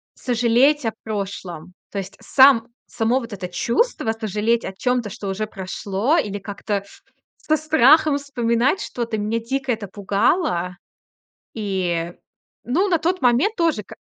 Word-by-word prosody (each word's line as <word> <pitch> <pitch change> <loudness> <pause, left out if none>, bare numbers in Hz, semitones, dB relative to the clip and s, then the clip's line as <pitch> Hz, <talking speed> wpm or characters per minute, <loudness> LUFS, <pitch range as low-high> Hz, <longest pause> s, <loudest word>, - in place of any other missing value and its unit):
сожалеть 245 +4 +2
о 225 - +1
прошлом. 190 -5 -5 0.2
То 200 - -4
есть 195 +1 -8
сам 260 -4 +5 0.2
само 230 +3 +1
вот 235 -2 -9
это 190 -2 -5
чувство 235 - 0
сожалеть 225 +1 -1
о 190 - -5
чём-то, 250 -2 0
что 205 0 -7
уже 210 +3 -2
прошло, 200 - -1
или 205 - -1
как-то 200 0 -4 0.5
со 310 - +1
страхом 310 0 +4
вспоминать 250 - 0
что-то, 230 -2 -3
мне 215 +2 -1
дико 265 +3 -2
это 220 -3 -3
пугало. 200 - 0 0.8
И, 180 -5 -2 0.5
ну 335 - +1
на 355 - +3
тот 355 +4 -1
момент 255 - +3
тоже, 330 - +1
к - - -13
230 Hz, 140 wpm, -21 LUFS, 200-270 Hz, 0.8 s, сам